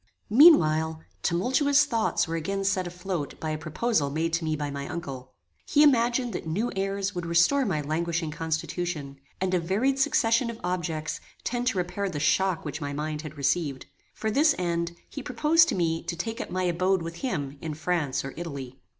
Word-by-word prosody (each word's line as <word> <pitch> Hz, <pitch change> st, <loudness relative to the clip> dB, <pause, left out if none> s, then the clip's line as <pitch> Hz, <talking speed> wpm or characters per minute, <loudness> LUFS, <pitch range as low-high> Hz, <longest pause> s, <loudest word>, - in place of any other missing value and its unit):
Meanwhile, 160 Hz, -, +6 dB, 0.2 s
tumultuous 275 Hz, -, +3 dB
thoughts 225 Hz, -, 0 dB
were 165 Hz, -, -2 dB
again 195 Hz, +5 st, -2 dB
set 190 Hz, -2 st, +1 dB
afloat 180 Hz, -3 st, -4 dB
by 155 Hz, -, -3 dB
a 155 Hz, -, -2 dB
proposal 155 Hz, 0 st, 0 dB
made 160 Hz, +3 st, -1 dB
to 165 Hz, 0 st, 0 dB
me 155 Hz, -1 st, 0 dB
by 145 Hz, -1 st, -3 dB
my 140 Hz, 0 st, -5 dB
uncle. 135 Hz, -6 st, -7 dB, 0.3 s
He 295 Hz, -, +5 dB
imagined 245 Hz, -3 st, +3 dB
that -, -, -5 dB
new 205 Hz, +10 st, -1 dB
airs 195 Hz, +1 st, -1 dB
would 175 Hz, -2 st, -4 dB
restore 170 Hz, +12 st, +3 dB
my 155 Hz, -6 st, 0 dB
languishing 165 Hz, +2 st, -1 dB
constitution, 160 Hz, -2 st, -3 dB, 0.2 s
and 185 Hz, 0 st, -1 dB
a 180 Hz, -, +3 dB
varied 215 Hz, +11 st, 0 dB
succession 230 Hz, -2 st, +3 dB
of 230 Hz, -1 st, -7 dB
objects 170 Hz, -4 st, -2 dB, 0.2 s
tend 245 Hz, 0 st, -2 dB
to 225 Hz, -6 st, +1 dB
repair 185 Hz, +3 st, -1 dB
the 150 Hz, -, -4 dB
shock 185 Hz, +3 st, +1 dB
which 150 Hz, +1 st, -5 dB
my 145 Hz, 0 st, -3 dB
mind 150 Hz, +1 st, -3 dB
had 155 Hz, -1 st, -9 dB
received. 140 Hz, -1 st, 0 dB, 0.3 s
For 220 Hz, -, -2 dB
this 295 Hz, +5 st, +4 dB
end, 170 Hz, -1 st, -1 dB
he 280 Hz, -, -7 dB
proposed 315 Hz, +6 st, +3 dB
to -, -, 0 dB
me 165 Hz, -2 st, 0 dB
to 170 Hz, -, -3 dB
take 225 Hz, +8 st, -4 dB
up -, -, -6 dB
my 185 Hz, +1 st, -1 dB
abode 185 Hz, +1 st, +1 dB
with 165 Hz, 0 st, -6 dB
him 145 Hz, -, -3 dB
in 155 Hz, -2 st, -4 dB
France 155 Hz, -4 st, -1 dB
or 135 Hz, -, -6 dB
Italy. 140 Hz, -6 st, -7 dB
175 Hz, 190 wpm, -27 LUFS, 155-215 Hz, 0.3 s, Meanwhile